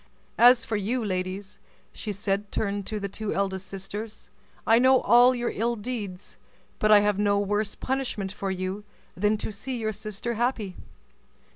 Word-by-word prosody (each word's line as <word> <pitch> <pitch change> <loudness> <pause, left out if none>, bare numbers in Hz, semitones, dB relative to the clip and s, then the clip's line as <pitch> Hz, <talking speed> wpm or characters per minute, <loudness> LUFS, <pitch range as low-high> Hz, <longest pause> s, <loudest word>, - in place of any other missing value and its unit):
As 245 0 +7
for 220 - -1
you, 225 +4 -1
ladies," 190 +1 -4
and - - -34
she 215 - -3 0.4
turned 200 -2 -2
to 215 -1 -2
the 200 - -3
two 210 +2 -4
elder 190 -1 0
sisters, 195 +3 -8 0.3
"I 225 +1 +5
know 260 +1 +6
all 245 +3 +6
your 240 -1 -1
ill 235 +3 0
deeds, 205 -5 -6 0.4
but 215 - +3
I 210 -1 +8
have 205 -1 +1
no 205 -1 +3
worse 205 +1 -1
punishment 255 -7 -2
for 195 -1 -4
you 190 +2 -3 0.3
than 210 +3 +2
to 215 - -4
see 250 +5 -5
your 220 -1 -2
sister 215 +3 -4
happy. 230 -5 -1
210 Hz, 165 wpm, -26 LUFS, 200-235 Hz, 0.4 s, I